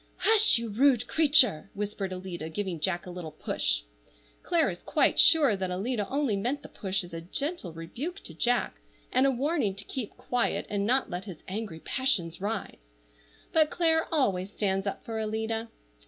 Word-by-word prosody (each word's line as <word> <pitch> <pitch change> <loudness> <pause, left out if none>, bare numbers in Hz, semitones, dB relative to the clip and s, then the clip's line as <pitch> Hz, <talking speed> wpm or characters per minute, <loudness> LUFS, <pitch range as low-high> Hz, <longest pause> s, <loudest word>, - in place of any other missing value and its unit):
"Hush, 440 - +5
you 230 -1 -3
rude 245 +2 +3
creature!" 275 - +4
whispered 200 -1 -3
Alida, 185 -3 -5
giving 180 0 -3
Jack 175 +2 -1
a 180 - -7
little 175 -3 -6
push. - - -1 0.6
Clare 340 -2 +2
is - - -8
quite - - +2
sure 300 -9 +6
that 190 -1 -3
Alida 205 +3 -2
only 275 -6 +1
meant 255 +8 -2
the - - -10
push 195 -1 -2
as 175 -1 -12
a 165 - -5
gentle 275 - -3
rebuke 235 - -6
to - - -10
Jack, 245 - 0 0.3
and 260 +2 +4
a - - +3
warning 265 - 0
to 200 - -7
keep 235 0 -6
quiet, 245 -1 0
and 200 0 0
not 260 -1 +2
let 180 +2 -4
his 185 -6 -9
angry 195 -4 -5
passions 185 -11 0
rise; - - -5 0.6
but 310 -1 +5
Clare 320 -1 +2
always 200 - +1
stands 195 -1 -1
up 200 - -4
for 225 -1 -3
Alida. 220 +1 -2
210 Hz, 175 wpm, -28 LUFS, 185-270 Hz, 0.6 s, sure